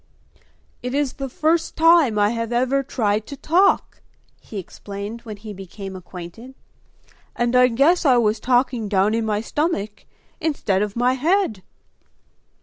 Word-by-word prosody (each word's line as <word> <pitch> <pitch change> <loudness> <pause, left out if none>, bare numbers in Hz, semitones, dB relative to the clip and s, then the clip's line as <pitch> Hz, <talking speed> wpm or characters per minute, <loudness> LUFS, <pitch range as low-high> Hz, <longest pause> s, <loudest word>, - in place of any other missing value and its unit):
"It 250 +2 -4
is 285 -3 0
the 270 -1 -5
first 325 +3 0
time 325 -8 +5
I 205 +1 +3
have 230 0 -3
ever 255 +3 +1
tried 215 -5 -1
to 280 - -8
talk," 360 +8 +2 0.4
he 215 - -10
explained 200 +4 -7
when 215 -3 -8
he 210 0 -9
became 195 0 -9
acquainted, 185 +7 -10 0.8
"and 240 +1 0
I 250 0 +6
guess 280 +10 +3
I 260 -5 +5
was 215 -2 +2
talking 245 -2 +1
down 200 +1 +2
in 225 -1 -1
my 210 -1 0
stomach 230 - -3 0.3
instead 275 -12 0
of 210 -1 -2
my 245 +2 +2
head!" 305 - +1
235 Hz, 145 wpm, -22 LUFS, 210-275 Hz, 0.8 s, I